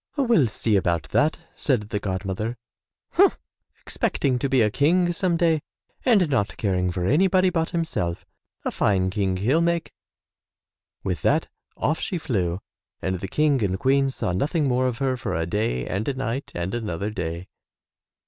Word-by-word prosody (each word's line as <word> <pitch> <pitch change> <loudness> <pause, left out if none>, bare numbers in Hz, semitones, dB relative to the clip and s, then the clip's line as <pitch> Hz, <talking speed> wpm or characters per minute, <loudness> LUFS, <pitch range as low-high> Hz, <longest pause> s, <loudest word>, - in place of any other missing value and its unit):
"We'll 235 - +4
see 110 -1 +1
about 85 -5 0
that," 155 +2 +2 0.2
said 115 -7 0
the 105 - -1
god 95 -1 -3
mother. 105 +5 -3 0.5
"Humph, - - +4 0.4
expecting 130 -3 0
to 135 - -1
be 130 -3 +4
a 105 - +2
King 175 - +3
some 170 -1 +1
day 165 -3 +2 0.4
and 210 -9 +4
not 130 -8 0
caring 90 -3 0
for 90 0 -2
anybody 185 - +3
but 165 -2 0
himself 160 - -2 0.2
— - - -44
a - - 0
fine 95 -2 +1
King 95 -2 0
he'll 130 - +2
make!" 170 -1 0 1.1
With - - -2
that - - +2 0.3
off 155 - 0
she 180 - -2
flew 95 - -1 0.4
and 95 -1 -2
the 95 - -4
King 145 +2 +2
and 95 -1 0
Queen 135 +4 +2
saw 130 - -2
nothing 145 - 0
more 130 0 +2
of 125 -2 -2
her 135 -2 0
for 115 - -3
a 80 0 0
day 85 - -1
and 100 +4 -3
a 140 - 0
night 135 +1 -3
and 85 +2 -3
another 105 -3 -3
day. 85 -3 -4
120 Hz, 175 wpm, -24 LUFS, 95-155 Hz, 1.1 s, We'll